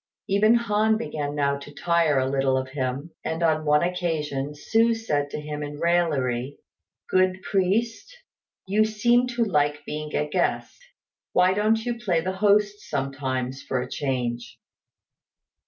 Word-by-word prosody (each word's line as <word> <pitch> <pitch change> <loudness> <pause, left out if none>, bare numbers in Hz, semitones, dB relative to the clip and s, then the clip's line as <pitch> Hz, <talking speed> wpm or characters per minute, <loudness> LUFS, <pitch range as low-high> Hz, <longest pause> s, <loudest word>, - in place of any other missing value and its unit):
Even 215 +3 +4
Han 220 -1 +2
began 150 -10 -4
now 140 -1 0
to 145 +1 -11
tire 165 -1 +1
a 130 0 +2
little 135 -1 +1
of 130 0 -3
him; 135 +3 -3
and 160 +1 -2
on 155 -1 +2
one 150 +2 +4
occasion 155 -6 -2
Hsü 225 +9 +2
said 145 -10 -1
to 150 - -5
him 150 0 -5
in 145 0 -6
raillery, 145 -7 0 0.5
"Good 185 0 +1
priest, 215 - 0 0.5
you 205 +3 +3
seem 235 +3 +2
to 240 -1 0
like 150 -7 0
being 150 0 -5
a 150 - 0
guest; 135 -8 -1 0.5
why 180 +1 +4
don't 220 +3 +1
you 240 -1 -2
play 185 -8 +1
the 185 +3 -2
host 205 +1 +2
sometimes 135 -2 -3
for 130 - -2
a 125 - -3
change?" 125 -4 -3
160 Hz, 150 wpm, -25 LUFS, 140-205 Hz, 0.5 s, Even